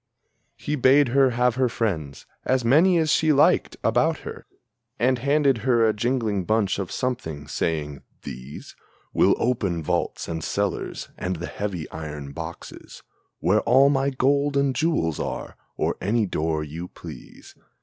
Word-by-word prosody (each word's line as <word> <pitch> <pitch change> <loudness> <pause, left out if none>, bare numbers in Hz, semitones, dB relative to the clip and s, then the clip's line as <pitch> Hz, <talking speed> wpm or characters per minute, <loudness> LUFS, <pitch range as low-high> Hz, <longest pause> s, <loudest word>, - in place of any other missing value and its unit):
He 150 - -3
bade 135 0 +4
her 135 +1 +4
have 125 0 +2
her 130 -2 +2
friends, 80 - -3 0.2
as 130 -2 +1
many 165 +9 +5
as 160 -2 +2
she 155 -1 +3
liked, 145 0 +3
about - - +2
her, - - -9 0.5
And 125 +2 +2
handed 140 -1 +2
her 115 -1 +3
a 110 - +2
jingling 110 -3 -1
bunch 105 0 +1
of 95 -3 -4
something, 80 - -3
saying, 75 -3 -2 0.2
"These 65 +3 -9 0.4
Will - - +4
open 100 -9 -1
vaults - - -2
and 80 -1 -4
cellars 100 -3 -3
and 90 +1 -2
the - - -5
heavy 95 -6 -4
iron 75 -3 -7
boxes 85 +2 -9 0.4
Where 105 +4 +3
all 135 +3 +5
my 135 -1 +1
gold 140 +2 +1
and 140 -1 +2
jewels 155 - 0
are, - - -5 0.2
or - - -1
any 110 +2 +1
door 80 -3 -1
you 80 +4 -7
please. - - -12
115 Hz, 150 wpm, -24 LUFS, 85-135 Hz, 0.5 s, many